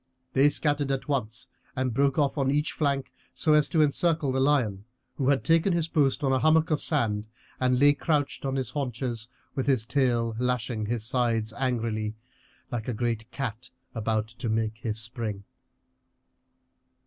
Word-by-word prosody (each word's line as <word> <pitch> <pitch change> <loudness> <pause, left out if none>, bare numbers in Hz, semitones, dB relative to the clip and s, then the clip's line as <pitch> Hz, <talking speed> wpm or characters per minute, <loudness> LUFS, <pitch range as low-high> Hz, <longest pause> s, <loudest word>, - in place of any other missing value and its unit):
They 140 +2 +5
scattered 145 -1 +1
at 135 -1 -2
once 125 -5 -2 0.3
and 130 -2 -1
broke 140 +2 +2
off 145 -3 +2
on 135 -3 +1
each 150 +2 +1
flank 140 -4 -1 0.2
so 155 - +2
as 150 -1 +4
to 160 -3 +4
encircle 155 0 +1
the 130 - 0
lion, 125 -8 +1 0.3
who 135 -1 +1
had 140 -1 +2
taken 165 +3 +3
his 170 -2 +1
post 145 -3 +1
on 135 - +2
a 130 - +2
hummock 155 +2 +3
of 150 - +1
sand 110 -8 0 0.3
and 125 -1 +2
lay 145 +1 +6
couched 145 -1 -1
on 135 -1 -1
his 130 -2 -2
haunches, 125 -4 -3 0.2
with 135 - -2
his 130 -6 +2
tail 120 -3 +1
lashing 125 -3 -1
his 115 -1 -2
sides 115 -3 0
angrily, 115 -4 -1 0.6
like 120 -3 -3
a 125 - -2
great 115 -1 -2
cat 125 -2 -5 0.2
about 110 -1 -1
to 115 +1 -5
make 110 0 -1
his 110 -2 -3
spring. 110 -3 -3
130 Hz, 170 wpm, -27 LUFS, 115-145 Hz, 0.6 s, lay